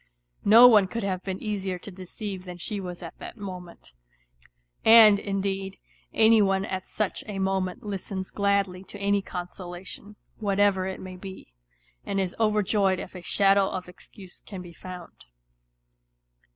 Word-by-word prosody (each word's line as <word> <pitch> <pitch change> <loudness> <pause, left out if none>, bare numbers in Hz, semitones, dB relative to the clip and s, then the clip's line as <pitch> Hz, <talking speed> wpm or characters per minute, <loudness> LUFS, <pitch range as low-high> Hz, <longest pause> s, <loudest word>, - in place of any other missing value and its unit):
No 230 +4 +9
one 210 -5 +6
could 230 +3 -4
have 185 -2 -2
been 190 -1 -4
easier 195 -4 -3
to 200 - -10
deceive 190 +1 -7
than 180 -1 -8
she 205 +4 -4
was 180 -2 -7
at - - -10
that - - -9
moment; 180 - -9 0.9
and, 220 -2 +8
indeed, 195 -1 -3 0.3
any 225 0 +5
one 195 -1 +2
at 190 -1 -5
such 215 -3 -2
a 205 -2 -5
moment 190 -1 -1
listens 195 -2 -5
gladly 200 -2 0
to 205 - -10
any 200 0 +1
consolation, 180 +2 -8 0.2
whatever 200 -2 +2
it 190 - -5
may 185 -1 -8
be, 190 - -10 0.5
and 195 - -2
is 185 -2 -2
overjoyed 210 -3 +2
if - - -8
a 180 - -8
shadow 195 +2 +3
of 185 -1 -5
excuse 180 +1 -13
can 190 -3 -8
be 175 -1 -12
found. 180 - -11
195 Hz, 150 wpm, -26 LUFS, 185-205 Hz, 0.9 s, No